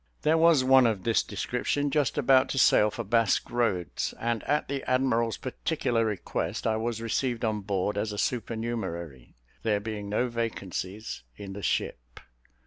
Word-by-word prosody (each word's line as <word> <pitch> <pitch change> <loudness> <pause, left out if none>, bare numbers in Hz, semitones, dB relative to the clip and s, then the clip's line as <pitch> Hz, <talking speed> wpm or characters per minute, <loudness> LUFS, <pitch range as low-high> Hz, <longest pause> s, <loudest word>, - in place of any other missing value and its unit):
There 155 +2 +4
was 165 -4 +5
one 130 -1 +6
of 105 -5 -1
this 115 -5 +3
description 145 0 -2
just 150 -2 +1
about 135 -1 +4
to - - -3
sail 105 -4 +5
for 115 +3 -5
Basque 115 0 +1
Roads; 105 -9 -1
and, 115 -2 -1
at 150 +2 +1
the 140 -1 -3
admiral's 125 -3 +1
particular 125 -3 -1
request, 105 -5 -3
I 110 - +2
was 115 0 -3
received 120 +1 -1
on 110 -1 -1
board 100 0 -1
as 110 +1 -2
a 105 - -6
supernumerary, 100 - -3 0.3
there 105 -2 +1
being 105 -1 -5
no 115 +5 +1
vacancies 110 -3 -4 0.2
in 100 -1 -7
the 100 - -7
ship. 60 -9 -2
115 Hz, 160 wpm, -28 LUFS, 100-125 Hz, 0.3 s, one